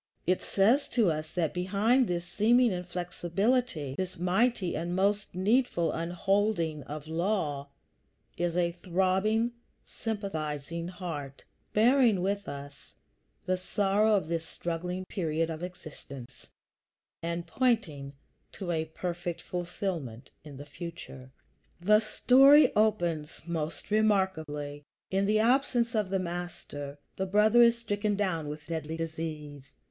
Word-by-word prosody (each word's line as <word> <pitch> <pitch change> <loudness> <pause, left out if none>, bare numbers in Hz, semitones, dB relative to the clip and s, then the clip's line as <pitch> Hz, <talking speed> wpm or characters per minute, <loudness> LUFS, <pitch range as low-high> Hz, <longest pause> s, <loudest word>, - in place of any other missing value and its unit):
It 185 +1 +2
says 230 +9 +3
to 210 -8 +5
us 155 0 -4
that 165 -4 0
behind 205 +8 +2
this 175 -1 -2
seeming 230 +6 +3
inflexibility, 180 - -1
this 185 +2 -4
mighty 185 +2 +1
and 170 +2 -2
most 200 0 0
needful 195 -2 +2
unholding 175 -1 0
of 150 0 -7
law, 160 -5 -1 0.7
is 175 0 -1
a 170 -1 +2
throbbing, 190 +6 +1 0.3
sympathizing 170 -7 -4
heart, 165 -7 -6 0.3
bearing 230 -3 +4
with 200 +1 -1
us 140 0 -10 0.5
the 185 0 +1
sorrow 205 +3 +2
of 190 -6 0
this 165 0 -1
struggling 175 +2 -4
period 165 -3 -1
of 160 0 -6
existence, 150 -7 -9 0.7
and 170 +1 -3
pointing 170 - 0 0.4
to 185 -4 -4
a 160 -1 0
perfect 175 +1 -4
fulfillment 170 - -4
in 145 -3 -10
the 145 - -8
future. 145 -4 -9 0.5
The 210 +4 +5
story 270 +7 +6
opens 175 -8 0
most 165 +2 -4
remarkably. 160 -9 0 0.3
In 195 +1 +1
the 215 +1 +3
absence 240 +1 +2
of 210 -4 0
the 195 - +1
Master, 170 -5 -5 0.2
the 190 - -1
brother 210 +4 +5
is 235 0 +6
stricken 205 -2 -1
down 185 -7 -1
with 150 0 -7
deadly 160 -1 -4
disease. 155 -4 -6
180 Hz, 120 wpm, -29 LUFS, 160-210 Hz, 0.7 s, story